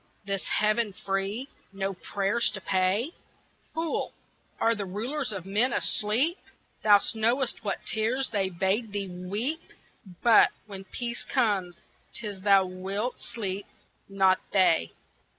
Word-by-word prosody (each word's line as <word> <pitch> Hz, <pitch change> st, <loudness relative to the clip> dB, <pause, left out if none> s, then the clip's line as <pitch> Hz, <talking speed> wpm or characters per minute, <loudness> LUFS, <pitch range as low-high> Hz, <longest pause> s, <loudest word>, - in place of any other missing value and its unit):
This 195 Hz, -1 st, -2 dB
heaven 215 Hz, 0 st, +1 dB
free 195 Hz, +7 st, -2 dB, 0.2 s
no 195 Hz, 0 st, -2 dB
prayers 200 Hz, +5 st, 0 dB
to 195 Hz, -, -6 dB
pay? 190 Hz, -, +1 dB, 0.6 s
Fool 325 Hz, 0 st, -1 dB, 0.5 s
are 230 Hz, -, +4 dB
the 200 Hz, -3 st, -4 dB
Rulers 240 Hz, +7 st, -2 dB
of 190 Hz, -4 st, -4 dB
men 215 Hz, +6 st, +2 dB
asleep? 240 Hz, -, +1 dB, 0.4 s
Thou 205 Hz, -1 st, +7 dB
knowest 235 Hz, +3 st, +1 dB
what 200 Hz, -2 st, -3 dB
tears 240 Hz, +5 st, 0 dB
They 195 Hz, -3 st, +1 dB
bade 195 Hz, +5 st, 0 dB
thee 200 Hz, -2 st, -2 dB
weep, 205 Hz, -, -3 dB, 0.6 s
But, 230 Hz, -2 st, +7 dB, 0.2 s
when 195 Hz, -2 st, -8 dB
peace 240 Hz, +4 st, -4 dB
comes, 200 Hz, -9 st, 0 dB, 0.3 s
'tis 205 Hz, -4 st, -5 dB
thou 195 Hz, -1 st, +5 dB
wilt 195 Hz, +6 st, -4 dB
sleep, 200 Hz, -3 st, -4 dB, 0.4 s
not 190 Hz, -1 st, +4 dB
They. 165 Hz, -, +4 dB
205 Hz, 125 wpm, -28 LUFS, 195-235 Hz, 0.6 s, Thou